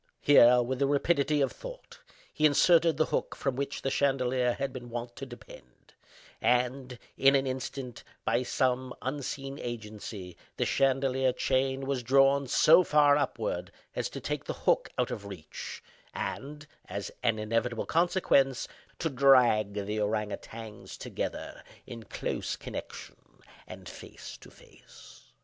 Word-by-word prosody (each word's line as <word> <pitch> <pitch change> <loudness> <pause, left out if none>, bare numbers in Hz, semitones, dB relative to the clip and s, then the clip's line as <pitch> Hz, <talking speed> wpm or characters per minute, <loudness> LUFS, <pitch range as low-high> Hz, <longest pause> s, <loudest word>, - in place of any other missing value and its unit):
Here, 125 -3 +7
with 130 +1 -3
the 140 - +2
rapidity 145 0 +2
of 135 - +1
thought, - - -10 0.3
he 155 -1 +4
inserted 165 +1 +4
the 155 - +3
hook - - -1
from 135 -3 -2
which 140 +1 -4
the 135 - 0
chandelier 130 -3 +1
had 135 0 -3
been 120 -2 -8
wont 120 0 -6
to 135 - -6
depend; 65 - -14 0.5
and, 125 +1 0 0.2
in 135 +1 +5
an 135 0 +2
instant, 130 -1 -5 0.2
by 115 +2 +2
some 130 0 0
unseen 135 0 -4
agency, 105 -5 -7 0.2
the - - +1
chandelier 135 -1 +2
chain 130 +1 0
was 135 -2 -1
drawn 135 +2 +4
so 165 +7 +6
far 150 -3 +5
upward 145 -2 -2 0.2
as - - -2
to - - -7
take - - -4
the - - -4
hook - - +3
out - - 0
of 100 -1 -6
reach, 90 -6 -8 0.3
and, 150 +2 -5 0.2
as 100 0 -5
an 115 -3 +1
inevitable 115 +2 -1
consequence, 160 -6 +2 0.3
to 165 - -1
drag 125 -7 +4
the 105 +1 -2
ourang 105 0 -1
outangs 110 -2 -9
together - - -5 0.2
in 115 -1 -8
close 110 - -4
connection, - - -8 0.5
and - - -10
face - - -10
to - - -15
face. - - -18
130 Hz, 145 wpm, -29 LUFS, 120-140 Hz, 0.5 s, Here